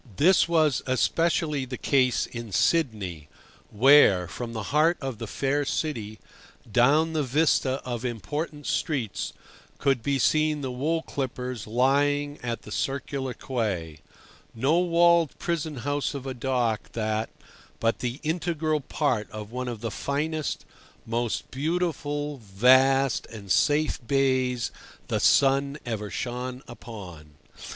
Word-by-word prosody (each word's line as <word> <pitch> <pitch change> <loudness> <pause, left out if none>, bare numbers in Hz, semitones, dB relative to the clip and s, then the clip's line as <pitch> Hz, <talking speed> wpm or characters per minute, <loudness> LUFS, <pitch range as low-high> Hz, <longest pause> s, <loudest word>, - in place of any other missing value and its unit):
This 180 +4 +5
was 155 -5 +3
especially 150 +2 +1
the 130 0 -6
case 130 -3 +2
in 115 -3 -8
Sydney, 100 - 0 0.4
where, 105 -6 +6
from 115 +7 -6
the 110 -2 -4
heart 160 +3 +4
of 135 -6 -5
the 115 - -5
fair 140 +6 0
city, 115 -8 -3 0.5
down 150 +8 +4
the 155 - +1
vista 140 -1 +2
of 120 -1 -4
important 145 - -4
streets, 130 -10 -2 0.5
could 135 -4 +1
be 140 +3 0
seen 155 +2 +2
the 130 -2 -3
wool 155 +6 -1
clippers 125 -4 -4
lying 145 +5 +1
at 120 -2 -4
the - - -11
Circular 135 -1 -3
Quay—no 110 - -3
walled 170 -3 +3
prison 160 -3 -2
house 145 +3 -2
of 135 -1 -6
a 135 - -3
dock 120 -3 -1
that, 110 0 -1 0.5
but 115 0 +1
the 125 +2 -3
integral 160 -1 0
part 130 -6 -1
of 105 0 -8
one 125 +1 -4
of 115 -3 -5
the 115 -2 -3
finest, 150 +5 -2 0.4
most 115 0 -2
beautiful, 150 -1 -2
vast, 130 +5 +3
and 100 -4 -8
safe 150 +7 +2
bays 130 -3 +1 0.4
the - - 0
sun 140 +1 +3
ever 105 -3 -3
shone 125 +2 -4
upon. 95 -11 -10
130 Hz, 130 wpm, -26 LUFS, 115-150 Hz, 0.5 s, where